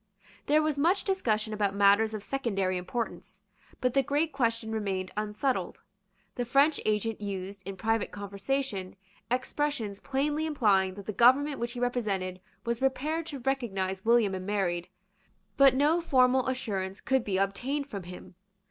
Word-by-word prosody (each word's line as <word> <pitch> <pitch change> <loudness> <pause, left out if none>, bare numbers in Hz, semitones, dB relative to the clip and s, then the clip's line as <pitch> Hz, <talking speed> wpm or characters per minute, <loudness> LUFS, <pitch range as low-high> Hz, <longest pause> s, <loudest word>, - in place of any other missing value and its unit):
There 305 +2 +4
was 305 -2 0
much 350 +7 +3
discussion 220 - 0
about 205 -2 0
matters 205 +2 +4
of 210 - -6
secondary 200 -9 -1
importance; 200 +6 -5 0.4
but 250 -1 +1
the 275 - +4
great 295 +4 0
question 230 -4 0
remained 195 -4 -2
unsettled. 210 -1 -1 0.6
The 245 - -2
French 275 +6 +3
agent 215 +1 0
used, 195 -1 -5
in 195 0 -6
private 225 +1 0
conversation, 200 +1 -3 0.3
expressions 250 -4 -1
plainly 295 +3 -1
implying 195 -10 +2
that 200 -1 -9
the 215 - -4
government 265 +7 +4
which 235 0 -2
he 245 - -6
represented 200 -7 -1 0.2
was 235 0 -1
prepared 300 +5 -1
to 280 -5 -6
recognise 195 -8 -2
William 230 -3 +4
and 185 0 -5
Mary; 180 -4 -1 0.7
but 275 -2 +6
no 300 +5 +3
formal 260 -5 +3
assurance 200 -7 -3
could 265 -2 +1
be 195 -4 -1
obtained 250 +9 -1
from 200 -8 -6
him. 180 +1 -10
230 Hz, 150 wpm, -29 LUFS, 195-270 Hz, 0.7 s, but